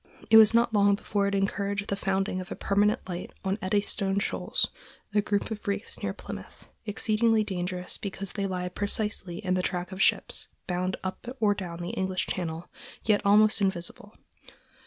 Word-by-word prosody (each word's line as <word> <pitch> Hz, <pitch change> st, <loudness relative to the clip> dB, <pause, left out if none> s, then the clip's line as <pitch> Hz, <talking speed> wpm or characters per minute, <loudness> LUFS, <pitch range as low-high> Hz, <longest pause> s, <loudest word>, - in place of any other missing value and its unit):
It 220 Hz, -, +10 dB
was 220 Hz, 0 st, +8 dB
not 235 Hz, 0 st, +3 dB
long 200 Hz, -1 st, +5 dB
before 200 Hz, 0 st, -1 dB
it 200 Hz, -, 0 dB
encouraged 200 Hz, +1 st, -1 dB
the 200 Hz, -, +1 dB
founding 195 Hz, -1 st, -1 dB
of 185 Hz, -, -10 dB
a -, -, -3 dB
permanent 205 Hz, +1 st, +1 dB
light 180 Hz, -1 st, -5 dB
on 190 Hz, +3 st, 0 dB
Eddystone 195 Hz, 0 st, +1 dB
Shoals, 200 Hz, -, 0 dB, 0.4 s
a 210 Hz, -, +4 dB
group 205 Hz, +1 st, -1 dB
of 210 Hz, -1 st, -6 dB
reefs 205 Hz, +2 st, -3 dB
near -, -, -1 dB
Plymouth, -, -, -10 dB, 0.2 s
exceedingly 220 Hz, +1 st, +2 dB
dangerous 180 Hz, -2 st, -3 dB
because 195 Hz, -1 st, -4 dB
they 200 Hz, -2 st, -1 dB
lie 180 Hz, -1 st, -2 dB
precisely 200 Hz, -2 st, -1 dB
in 185 Hz, -, +2 dB
the 185 Hz, -, +1 dB
track 180 Hz, 0 st, -2 dB
of 190 Hz, +1 st, -4 dB
ships -, -, +1 dB, 0.2 s
bound 185 Hz, 0 st, -1 dB
up 190 Hz, +4 st, -5 dB
or 210 Hz, -2 st, +4 dB
down 175 Hz, -3 st, -6 dB
the 175 Hz, -, -3 dB
English 190 Hz, -1 st, -1 dB
Channel, 165 Hz, -2 st, -4 dB, 0.4 s
yet 210 Hz, -2 st, +3 dB
almost 210 Hz, +1 st, +5 dB
invisible. 190 Hz, +2 st, -2 dB
200 Hz, 175 wpm, -28 LUFS, 185-205 Hz, 0.4 s, It